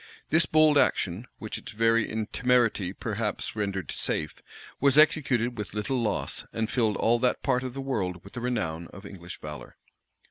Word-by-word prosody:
This 165 +2 +4
bold 155 -2 +5
action, 100 -1 +1
which 110 - -5
its - - -10
very 115 +1 +3 0.2
temerity 120 -7 +2
perhaps 105 +1 -3
rendered 100 -5 -2
safe, 75 -1 -2 0.4
was 140 0 +4
executed 130 -7 +3
with 105 0 -5
little 120 +4 -1
loss, 105 -4 -1
and 110 0 -2
filled 110 -5 +1
all 120 +1 +3
that 125 +1 +1
part 125 -2 +2
of 130 -1 -5
the 135 - -4
world 95 -10 -2
with 100 - -14
the 120 - -5
renown 85 -10 -2
of 100 - -12
English 90 -3 -9
valor. 75 -1 -8
115 Hz, 170 wpm, -27 LUFS, 100-125 Hz, 0.4 s, bold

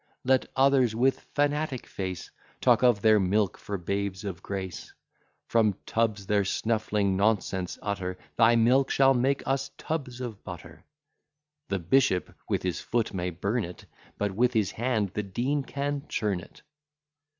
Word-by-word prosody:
Let 130 0 +3
others 130 -4 +4
with 130 +3 +2 0.2
fanatic 145 -2 0
face 95 -3 -5 0.3
Talk - - +4
of 120 -5 +4
their 110 -1 +6
milk 100 +1 +1
for 100 - -5
babes 100 +2 -3
of 95 -3 -5
grace; 95 -3 -5 0.6
From 110 -4 +3
tubs 110 -3 0
their 100 0 +2
snuffling 105 -1 0
nonsense 95 -3 0
utter; 95 -3 -3 0.2
Thy 115 0 +5
milk 125 +4 +4
shall 135 0 +5
make 135 +2 +1
us 135 0 0
tubs 135 -6 -4
of 120 -5 -6
butter. - - -10 0.9
The 100 - 0
bishop 95 +1 +2 0.2
with - - 0
his 90 -2 -2
foot 115 -3 -1
may 90 -1 -2
burn 100 +7 -1
it, 90 -1 -9 0.3
But 105 -1 -1
with 120 +5 +2
his 105 -5 +1
hand 115 -4 0
the 105 - -3
Dean 120 +9 -1
can 140 +1 -3
churn 100 -4 -1
it. 90 - -15
110 Hz, 150 wpm, -28 LUFS, 95-130 Hz, 0.9 s, their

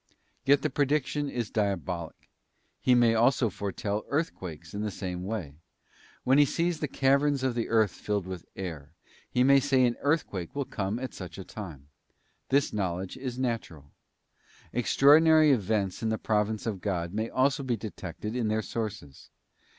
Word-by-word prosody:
Yet 140 0 +4
the - - 0
prediction 145 +1 0
is 120 -5 -3
diabolic. 95 -5 -2 0.5
He 125 - +4
may 120 -2 +5
also 120 0 +3
foretell 100 +2 -3
earthquakes 90 - -3
in 100 - -3
the 105 - -1
same 90 -2 -5
way. 95 -10 -4 0.7
When 130 +3 +4
he - - +8
sees 170 +3 -1
the 150 - -1
caverns 140 +1 +2
of 130 -2 +1
the 115 -1 -2
earth 110 -3 +3
filled 105 -2 -2
with 95 -2 -7
air, 80 -5 -6 0.4
he 125 - +2
may 140 +1 +6
say 135 -2 +3
an 120 -1 0
earthquake 140 - -1
will 140 -1 -1
come 100 -1 -3
at 130 +1 -5
such 90 -3 -8
atime. 90 - -9 0.6
This 140 +1 +2
knowledge 95 -2 -2
is 130 -2 -5
natural. 110 - -3 0.8
Extraordinary 155 +5 +6
events 105 -5 0
in 115 - 0
the 110 - 0
providence 105 0 0
of 105 -5 -3
God 85 -3 -2
may 110 +2 -1
also 135 +2 +2
be 125 -4 -1
detected 105 0 -6
in 120 -3 0
their 110 0 0
sources. 105 - -6
110 Hz, 160 wpm, -28 LUFS, 95-130 Hz, 0.8 s, he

